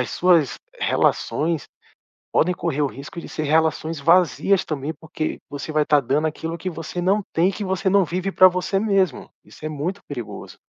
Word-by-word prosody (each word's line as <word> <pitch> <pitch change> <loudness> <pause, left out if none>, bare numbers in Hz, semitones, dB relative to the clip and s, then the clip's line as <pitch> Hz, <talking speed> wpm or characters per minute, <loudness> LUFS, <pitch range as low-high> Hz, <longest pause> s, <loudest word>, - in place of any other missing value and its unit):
as - - -6
suas 170 -6 +3 0.2
relações 160 0 0 0.7
podem 180 +2 +3
correr 155 -4 -1
o - - +3
risco 140 +5 -8
de - - -10
ser 155 - -4
relações 160 +1 +1
vazias 175 +4 +3
também 150 0 -3
porque 155 -1 -4
você 145 +2 -6
vai 155 0 +3
estar 150 0 +4
dando 145 +4 0
aquilo 165 +2 -5
que 185 +2 -4
você 165 +2 -5
não 195 +4 +2
tem 170 +3 +3
e - - -1
que 205 - -5
você 190 +1 0
não 200 -1 +4
vive 185 +3 -2
pra 185 - +7
você 185 +2 -1
mesmo, 195 -3 +1 0.2
isso - - -15
é - - -1
muito 155 +7 -4
perigoso. 120 -7 -7
165 Hz, 190 wpm, -22 LUFS, 150-185 Hz, 0.7 s, pra